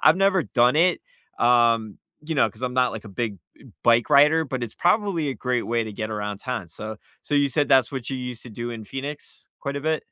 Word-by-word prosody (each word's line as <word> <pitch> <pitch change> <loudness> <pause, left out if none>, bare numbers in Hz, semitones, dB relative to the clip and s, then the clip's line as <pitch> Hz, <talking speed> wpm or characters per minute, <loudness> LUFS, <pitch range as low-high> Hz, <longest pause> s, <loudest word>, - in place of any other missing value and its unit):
I've 155 +2 +6
never 195 -2 +3
done 125 +2 +3
it, 175 +3 +3 0.4
um, 115 -3 +3 0.3
you 160 0 -3
know, 130 -5 +3
'cause 110 +5 -15
I'm 125 - -1
not, 125 -1 +2
like, 110 0 -7
a - - -9
big 110 0 -3 0.3
eh, - - -17
b - - -15
bike 120 0 +4
rider, 150 +3 +5
but 130 -2 -4
it's 115 - -5
probably 180 -5 +1
a 135 - -2
great 125 -2 -2
way 115 -1 0
to 110 - -7
get 110 +2 -4
around 105 -1 -4
town, 125 -6 -4
so 110 +5 -7 0.2
so, 145 - -3
you 145 -1 +3
said 145 +1 +1
that's 130 -1 +4
what 130 -3 -5
you 135 - -3
used 125 -2 -6
to 120 - -10
do 120 +2 -5
in 110 -2 -7
Phoenix 140 +6 -7
quite 140 0 -4
a 140 - -4
bit? 155 0 0
125 Hz, 250 wpm, -24 LUFS, 115-145 Hz, 0.4 s, I've